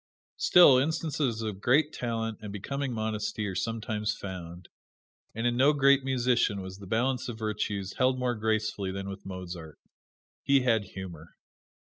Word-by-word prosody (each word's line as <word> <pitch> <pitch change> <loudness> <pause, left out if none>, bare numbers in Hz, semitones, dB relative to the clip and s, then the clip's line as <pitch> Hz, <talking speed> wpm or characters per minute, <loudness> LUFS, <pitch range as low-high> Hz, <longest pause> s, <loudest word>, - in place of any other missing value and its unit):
Still, 145 -8 +7
instances 145 -6 -1
of 105 -3 -4
great 145 +6 +3
talent 115 -2 -3
and 105 -2 -7
becoming 135 +7 -3
modesty 110 -1 -2
are 100 - -3
sometimes 110 +1 -2
found; 90 -2 -8 0.7
and 115 +2 -2
in 120 0 +2
no 135 +4 +5
great 140 -1 +4
musician 125 -5 +1
was 95 +1 -8
the 100 - -10
balance 125 +5 0
of 115 - -6
virtues 105 -3 -3
held 130 0 +3
more 125 -1 0
gracefully 110 -3 -1
than 95 +1 -5
with 95 0 -8
Mozart. 90 -4 -7 0.6
He 140 -1 +3
had 115 -4 +2
humor. 90 -4 -9
110 Hz, 150 wpm, -29 LUFS, 100-125 Hz, 0.7 s, Still